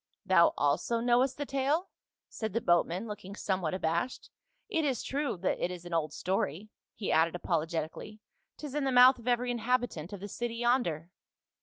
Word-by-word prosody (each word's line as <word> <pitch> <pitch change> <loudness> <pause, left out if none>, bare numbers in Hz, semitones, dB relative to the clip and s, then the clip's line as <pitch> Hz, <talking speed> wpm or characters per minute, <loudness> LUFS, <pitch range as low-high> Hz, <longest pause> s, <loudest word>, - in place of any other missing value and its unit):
"* - - -61
"Thou 185 -3 +5
also 145 +11 +1
knowest 245 +2 +2
the 290 - -3
tale?" 280 +7 0 0.4
said 220 -3 -5
the 230 - +1
boatman 175 +2 +1
looking 205 -2 -7
somewhat 185 -5 -1
abashed. 170 +6 -2 0.4
"It 325 -7 0
is 265 -6 0
true 280 -5 -2
that 185 - -1
it - - +1
is 180 -1 -8
an 175 - -7
old 155 -2 0
story," 185 +3 -2 0.3
he 205 - -3
added 160 +2 +3
apologetically, 165 +5 -3 0.2
" - - -49
'tis 295 -3 -7
in 295 -1 -1
the 265 - +1
mouth 250 +1 +7
of 235 - -13
every 245 0 +1
inhabitant 240 -8 -1
of 200 - -6
the 200 - -6
city 235 +3 -4
yonder." 230 - 0
210 Hz, 185 wpm, -30 LUFS, 175-250 Hz, 0.4 s, mouth